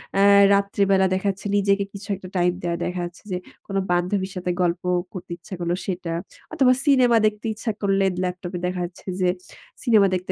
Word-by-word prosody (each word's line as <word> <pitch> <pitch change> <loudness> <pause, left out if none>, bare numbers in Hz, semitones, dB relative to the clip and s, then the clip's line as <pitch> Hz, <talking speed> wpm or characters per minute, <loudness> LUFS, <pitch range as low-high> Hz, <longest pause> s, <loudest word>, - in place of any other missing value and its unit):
অ্যাঁ 200 0 +6
রাত্রিবেলা 200 -1 +2
দেখাচ্ছে 195 +1 -2
নিজেকে 200 0 +2
কিছু 200 0 -9
একটা 185 -1 -10
টাইম 175 0 +3
দেওয়া 170 -1 -1
দেখা 180 0 -3
যাচ্ছে 175 +4 -11
যে, 180 - 0 0.3
কোন 195 - -5 0.2
বান্ধবীর 185 +2 0
সাথে 180 0 -2
গল্প 175 0 0 0.3
করতে 180 -1 -8
ইচ্ছা 185 +3 -12
করল 170 0 -1
সেটা। 180 -3 -3 0.4
অথবা 265 -5 +4
সিনেমা 250 -5 +5
দেখতে 210 0 -1
ইচ্ছা 220 +1 -3
করলে 195 -1 +2 0.2
ল্যাপটপ 180 0 -4
এ - - -5
দেখা 180 0 -3
যাচ্ছে 175 +2 -12
যে, 180 - +3 0.5
সিনেমা 215 -6 +5
দেখতে 185 +1 -3
190 Hz, 180 wpm, -23 LUFS, 180-200 Hz, 0.5 s, অ্যাঁ